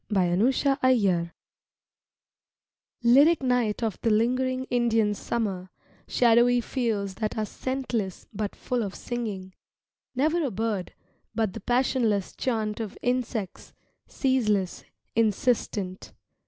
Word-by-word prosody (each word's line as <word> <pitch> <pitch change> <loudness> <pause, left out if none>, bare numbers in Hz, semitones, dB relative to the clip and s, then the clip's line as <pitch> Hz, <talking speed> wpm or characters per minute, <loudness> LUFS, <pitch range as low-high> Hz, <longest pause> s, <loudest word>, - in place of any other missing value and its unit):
II 210 - 0 0.2
INDIAN 220 +9 +4 0.3
SUMMER 200 -10 +2 1.7
LYRIC 280 +6 +5
night 245 -4 +1
of 220 -4 -2
the 230 - +1
lingering 255 +4 +1
Indian 225 -3 +2
Summer, 195 -3 -3 0.4
Shadowy 240 +1 +4
fields 225 -5 -2
that 215 0 -1
are 215 - 0
scentless 240 -6 -3
but 210 -1 -3
full 250 -1 -2
of 200 -3 -4
singing, 205 -6 -5 0.6
Never 315 +6 +2
a 280 - 0
bird, 215 -3 -3 0.4
but 220 -5 0
the - - -7
passionless 240 -4 +1
chant 220 -4 -1
of 215 -3 -5
insects, 245 -6 -2 0.3
Ceaseless, 215 -9 0 0.3
insistent. 210 -3 0
225 Hz, 110 wpm, -26 LUFS, 205-250 Hz, 1.7 s, LYRIC